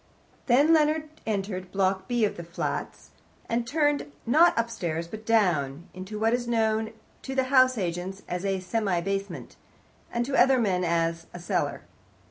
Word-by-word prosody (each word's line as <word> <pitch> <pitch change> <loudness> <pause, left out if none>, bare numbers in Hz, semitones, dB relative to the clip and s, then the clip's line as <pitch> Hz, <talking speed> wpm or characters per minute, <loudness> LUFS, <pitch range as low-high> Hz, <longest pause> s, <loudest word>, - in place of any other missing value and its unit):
Then 280 +6 +5
Leonard 310 0 +2 0.2
entered 195 -3 -3
Block 190 -1 0
B 240 -3 +2
of 205 - -2
the 170 - -7
flats, 170 +1 -5 0.4
and 235 0 -1
turned, 290 - 0
not 315 +9 +5
upstairs, 175 -8 -2
but 220 +4 -9
down, 170 -9 +1
into 185 +3 -7
what 225 +1 +2
is 240 0 -1
known 220 -1 0 0.3
to 265 - -6
house 255 -1 +4
agents 185 +1 -4
as 180 +1 -3
a 195 -1 0
semi 195 -2 0
basement, 195 +2 -4 0.5
and 235 0 -1
to 270 +1 -2
other 265 +1 +5
men 190 -6 +1
as 165 -1 0
a - - -6
cellar. 170 - -2
215 Hz, 155 wpm, -27 LUFS, 180-240 Hz, 0.5 s, Then